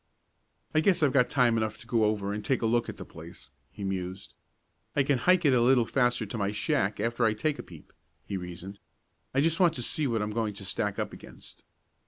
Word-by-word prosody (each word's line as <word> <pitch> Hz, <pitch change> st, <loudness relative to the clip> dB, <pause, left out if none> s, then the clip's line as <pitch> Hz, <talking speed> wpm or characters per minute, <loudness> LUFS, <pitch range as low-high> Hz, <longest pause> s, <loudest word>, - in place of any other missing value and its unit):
"I 155 Hz, -, +4 dB
guess 175 Hz, 0 st, +3 dB
I've 140 Hz, -, +3 dB
got 125 Hz, -3 st, +4 dB
time 120 Hz, -4 st, +3 dB
enough 110 Hz, -1 st, -1 dB
to -, -, -12 dB
go 115 Hz, -2 st, +2 dB
over 105 Hz, -1 st, 0 dB
and 105 Hz, 0 st, -4 dB
take 130 Hz, -3 st, 0 dB
a -, -, +3 dB
look 120 Hz, +1 st, +1 dB
at -, -, -7 dB
the -, -, -8 dB
place," 65 Hz, 0 st, -10 dB, 0.2 s
he 100 Hz, -, -9 dB
mused. 95 Hz, -7 st, -4 dB, 0.6 s
"I 145 Hz, -, +4 dB
can 135 Hz, -2 st, +1 dB
hike 180 Hz, +2 st, +3 dB
it 140 Hz, -, +5 dB
a 125 Hz, -, +4 dB
little 125 Hz, -1 st, +5 dB
faster 120 Hz, -2 st, +1 dB
to 105 Hz, +3 st, -6 dB
my 100 Hz, 0 st, 0 dB
shack 105 Hz, -1 st, 0 dB
after 115 Hz, +2 st, 0 dB
I 110 Hz, -1 st, +3 dB
take 150 Hz, +7 st, -1 dB
a -, -, -2 dB
peep," 85 Hz, -4 st, -15 dB, 0.3 s
he 100 Hz, -, -4 dB
reasoned. 90 Hz, +2 st, -7 dB, 0.5 s
"I 135 Hz, -, +2 dB
just 165 Hz, +2 st, +1 dB
want 175 Hz, -3 st, +4 dB
to 120 Hz, -, -3 dB
see 150 Hz, +4 st, -1 dB
what 115 Hz, -3 st, 0 dB
I'm 105 Hz, -, -3 dB
going 110 Hz, -2 st, -1 dB
to 100 Hz, -, -8 dB
stack 105 Hz, +2 st, -2 dB
up -, -, -3 dB
against." -, -, -13 dB
115 Hz, 235 wpm, -28 LUFS, 100-130 Hz, 0.6 s, it